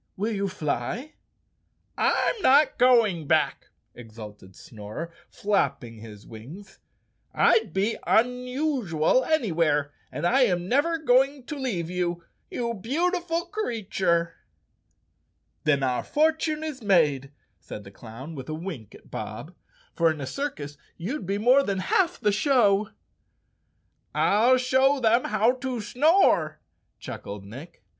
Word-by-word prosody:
Will 210 +4 -1
you 200 -1 -1
fly?" 185 - -4 0.8
"I'm 450 - +1
not 285 -1 +4
going 225 - +4
back," - - +1 0.3
exulted 105 -5 -12
Snorer, 110 - -8 0.2
flapping 130 - -1
his 105 -2 -12
wings. 150 - -12 0.6
"I'd 225 -5 +3
be 195 +6 0
unusual 250 - +1
anywhere 165 - +1 0.2
and - - -4
I 260 +9 +3
am 180 -7 +1
never 290 - +2
go¬ 265 -4 +4
ing 275 -1 -11
to 300 - -6
leave 230 - -3
you, 175 -1 -2 0.3
you 235 -1 -3
beautiful 335 - -1
creature." 200 - -1 1.3
"Then 140 -2 +2
our 125 -2 0
fortune 310 0 0
is 300 -5 -5
made," 150 - +2 0.3
said 100 +5 -9
the 100 - -13
clown, 120 +9 -10
with 135 -2 -8
a 155 - -3
wink 155 - -8
at - - -18
Bob, - - -7 0.4
"for 165 -1 +3
in 155 -1 -3
a 135 - -4
circus 145 - -5 0.2
you'd 200 - -5
be 200 +1 -1
more 250 +6 +5
than 200 -8 -2
half 360 - +1
the 210 -3 +2
show." 215 -3 +2 1.3
"I'll 235 +6 +4
show 260 +2 +2
them 235 0 +3
how 215 +3 +2
to 255 -2 -4
snore," 310 - +2 0.4
chuckled 100 -1 -8
Nick. 135 - -12
205 Hz, 130 wpm, -25 LUFS, -, 1.3 s, more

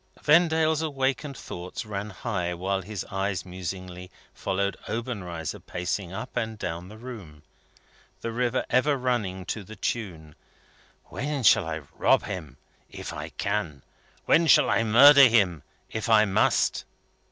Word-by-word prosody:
Vendale's 160 0 +4
awakened 140 -2 -2
thoughts 90 +4 -7
ran 105 0 -5
high 90 -4 -3
while 95 +2 -1
his 100 0 -6
eyes 95 -1 -2
musingly 90 0 -7 0.2
followed 100 +1 -1
Obenreizer 95 -9 -4
pacing 90 +1 -4
up 110 +6 -7
and 110 -1 -2
down 85 -1 -5
the 110 - -11
room, 105 - -10 0.8
the 115 - -3
river 125 +2 0
ever 140 +3 +3
running 105 -8 -2
to 105 - -4
the 110 +3 -11
tune: 90 -9 -4 0.7
"Where 145 -2 -4
shall 110 -5 +5
I 80 -1 -4
rob - - +3
him, 75 -8 -7 0.3
if - - -7
I - - -6
can? 100 -9 -3 0.4
Where 165 +1 +4
shall - - +6
I - - +3
murder 135 +5 +8
him, 100 - +2 0.3
if 110 +1 -3
I 110 -1 +6
must?" 100 -2 +2
105 Hz, 140 wpm, -26 LUFS, 90-125 Hz, 0.8 s, murder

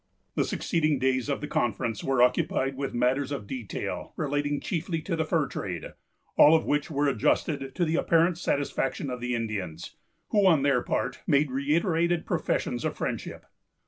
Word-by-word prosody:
The - - +1
succeeding 155 -3 0
days 130 +1 0
of 140 - -1
the 150 - -4
conference 115 -3 -1
were 135 -2 +3
occupied 135 0 +1
with 135 -1 -4
matters 130 +3 +1
of 135 -8 -4
detail 120 -1 -5
relating 145 -1 -1
chiefly 165 -2 -2
to 170 - -2
the 160 -1 0
fur 155 -1 +1
trade, 90 - -5 0.4
all 155 +2 +8
of 160 - +1
which 150 +1 0
were 145 -1 +1
adjusted 135 +2 0
to 175 - +1
the 160 0 0
apparent 165 +1 +3
satisfaction 140 -3 -1
of 125 -1 -5
the 125 0 -1
Indians, 95 -8 -4 0.3
who, 205 -2 +4
on 160 -6 +4
their 140 -3 +3
part, 125 +1 -2
made 145 -2 +3
reiterated 165 +5 +1
professions - - -1
of - - -2
friendship. - - -4
140 Hz, 170 wpm, -27 LUFS, 125-160 Hz, 0.4 s, all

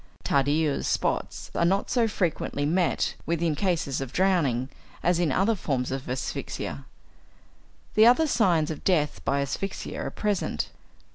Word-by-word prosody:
Tardieu's 145 +2 +1
spots - - -1
are - - +1
not 195 +4 +1
so 240 -2 +3
frequently 170 -7 -1
met 175 +3 +1
with 170 0 0
in 165 -2 +1
cases 160 -5 -1
of 135 -2 -5
drowning 155 -10 +2 0.4
as 175 0 +2
in 170 -5 +2
other 195 +10 +2
forms 135 - -2
of 135 -1 -4
asphyxia. 100 - -4 1.1
The 220 +1 +7
other 250 +7 +5
signs 180 - +2
of 155 - -7
death 150 -6 +1
by 140 0 +1
asphyxia 190 +8 -4
are - - -3
present. 210 -2 -1
165 Hz, 145 wpm, -26 LUFS, 140-195 Hz, 1.1 s, The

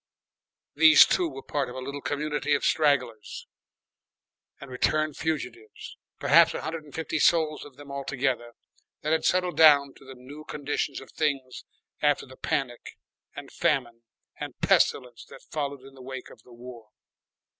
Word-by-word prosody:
These 160 +1 +8
two 175 -2 0
were 135 -2 -10
part 140 -3 -2
of 125 - -9
a - - -5
little 140 +2 -6
community 150 0 -1
of - - -2
stragglers 130 -8 0 1.1
and 140 -1 -11
returned 155 +4 0
fugitives, 125 -8 -5 0.2
perhaps - - +5
a - - -4
hundred 160 -1 -5
and 145 - -14
fifty 160 -1 -3
souls 155 -1 +2
of 145 -3 -14
them 145 -1 -12
all 140 0 -5
together, 130 -3 -2 0.5
that 155 - -1
had 160 - +1
settled 180 -1 +1
down 145 -3 +6
to - - -18
the 135 0 -12
new 140 +5 -12
conditions 145 -2 -3
of 135 - -14
things 135 -5 -3 0.4
after 145 -1 +2
the 130 -1 -14
Panic 125 -3 -4 0.4
and - - -9
Famine 120 -5 -1 0.4
and - - -7
Pestilence 125 -2 +1
that - - -15
followed 140 -3 -3
in 135 0 -14
the 135 - -14
wake 130 0 -8
of - - -16
the 125 - -20
War. 120 -2 -12
140 Hz, 165 wpm, -26 LUFS, 130-150 Hz, 1.1 s, These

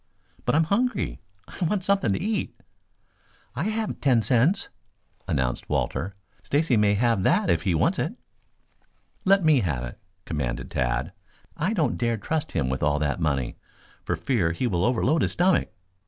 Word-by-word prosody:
"But - - +2
I'm 160 - +5
hungry. 235 +9 0 0.3
I - - -6
want 185 +3 0
something 195 - +2
to - - -1
eat." 215 0 -2 1.0
"I 140 +7 -2
have 220 +1 -2
ten 125 -5 +3
cents," 140 - +2 0.6
announced 65 -2 -1
Walter. 90 +8 -1 0.3
"Stacy 140 - +1
may 105 -1 +3
have 115 -2 +2
that 95 - +3
if 85 -1 +2
he 90 0 +1
wants - - +2
it." - - -2 1.1
"Let 195 -2 +4
me 155 -4 +5
have 75 - -1
it," - - -7 0.3
commanded 70 -7 -3
Tad. 65 +6 -1 0.4
"I 170 +7 0
don't 165 -9 0
dare 115 -1 +1
trust 160 +7 -3
him 70 -7 0
with 65 +1 -2
all 75 0 +2
that 75 +2 -1
money 70 -6 -1 0.5
for - - -1
fear 95 -11 0
he 105 - -2
will 90 -6 +1
overload 130 +6 +2
his - - +1
stomach. 180 +1 +2
115 Hz, 165 wpm, -25 LUFS, -, 1.1 s, I'm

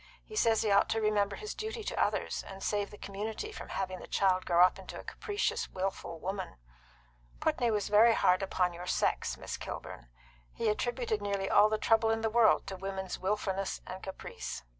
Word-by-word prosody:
He 430 - -10
says 225 - +3
he 215 - +1
ought 200 0 +4
to 225 - +1
remember 210 -2 +1
his 425 0 -6
duty 440 +1 -5
to - - 0
others, - - -1
and 195 0 -8
save 205 -1 0
the 205 - -12
community 215 - -5
from - - -8
having 185 -1 -3
the - - -10
child 185 -2 +2
grow 175 0 +6
up 185 - 0
into - - -8
a - - -9
capricious, 425 +2 -2
wilful 185 -3 -4
woman. 190 +1 -4 0.8
Putney 240 - +1
was 210 -2 0
very 220 +2 +6
hard 180 +2 +3
upon 180 -2 0
your 175 +1 -8
sex, - - 0
Miss - - -5
Kilburn. - - -7 0.5
He 230 -2 +1
attributed 235 0 -1
nearly 200 -1 -1
all 210 +1 +6
the 215 - +1
trouble 225 +1 +3
in 225 0 +1
the 225 -1 0
world 230 -1 +5
to 195 - -5
women's 190 0 -4
wilfulness 195 0 -1
and 185 +1 -7
caprice." 190 - -6
205 Hz, 195 wpm, -31 LUFS, 190-225 Hz, 0.8 s, grow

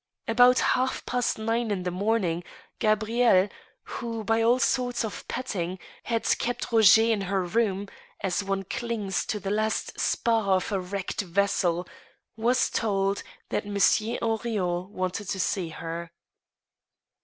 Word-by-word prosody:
About 245 +2 +6
half 255 +1 +1
past 245 -1 0
nine 225 +1 -1
in 195 -3 -1
the 180 - -2
morning, 185 -3 0 0.4
Gabrielle, 215 -2 +3 0.3
who, 230 -2 -5
by 225 +2 +2
all 235 +2 +4
sorts 245 -2 0
of 215 - -7
petting, 185 -8 -3 0.3
had 230 -1 -1 0.2
kept 245 0 -3
Roger 220 -1 +7
in 225 -3 +1
her 195 0 0
room, 200 +1 0 0.3
as 190 +1 -1
one 195 0 -2
clings 225 -3 -2
to 210 - -2
the 195 0 -3
last 215 +1 -1
spar 225 -5 +2
of 185 - -2
a 195 - +1
wrecked 185 +2 -3
vessel, 180 -2 0 0.5
was 240 +3 +2
told 195 -2 0 0.3
that - - -2
Monsieur 210 +3 +2
Henrion 205 -6 -1
wanted 185 0 -3
to 190 - -2
see 180 -2 -1
her. 165 +1 -6
205 Hz, 140 wpm, -27 LUFS, 190-230 Hz, 0.5 s, Roger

